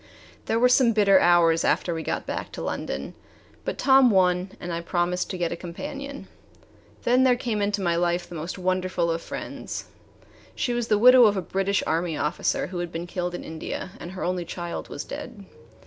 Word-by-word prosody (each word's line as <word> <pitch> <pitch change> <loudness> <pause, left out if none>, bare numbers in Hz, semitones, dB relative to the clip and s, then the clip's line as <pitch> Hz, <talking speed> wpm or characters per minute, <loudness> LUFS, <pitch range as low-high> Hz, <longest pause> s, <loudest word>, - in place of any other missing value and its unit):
There 225 - +1
were 245 +2 +5
some 250 -2 +4
bitter 200 -3 +5
hours 170 -2 +4
after 175 - +1
we 165 - -3
got - - -3
back - - -4
to - - -6
London. 70 +1 -4 0.5
But - - -3
Tom 265 -1 +6
won, 185 -2 +2
and 175 -1 -5
I 170 - -2
promised 175 +1 -1
to 185 - -4
get 175 -2 -1
a - - -2
companion. 275 - -7 0.8
Then 250 +2 +4
there 255 -1 +5
came 235 -4 -2
into 200 -1 0
my 170 -1 +1
life 175 +1 0
the - - -11
most 165 +3 -5
wonderful 185 -2 0
of 165 0 -2
friends. - - -6 0.7
She 245 - -1
was 240 -1 -1
the 210 - +3
widow 250 +2 +8
of 205 -2 +3
a - - 0
British 195 +3 0
Army 165 0 -1
officer 150 +4 0
who 180 -1 -5
had 175 -1 -4
been 165 +1 -4
killed 175 0 -3
in - - -6
India, 160 +3 -6
and 175 - -8
her 190 - -5
only 180 0 -1
child 175 0 -6
was - - -5
dead. 205 -4 -8
180 Hz, 200 wpm, -25 LUFS, 170-215 Hz, 0.8 s, widow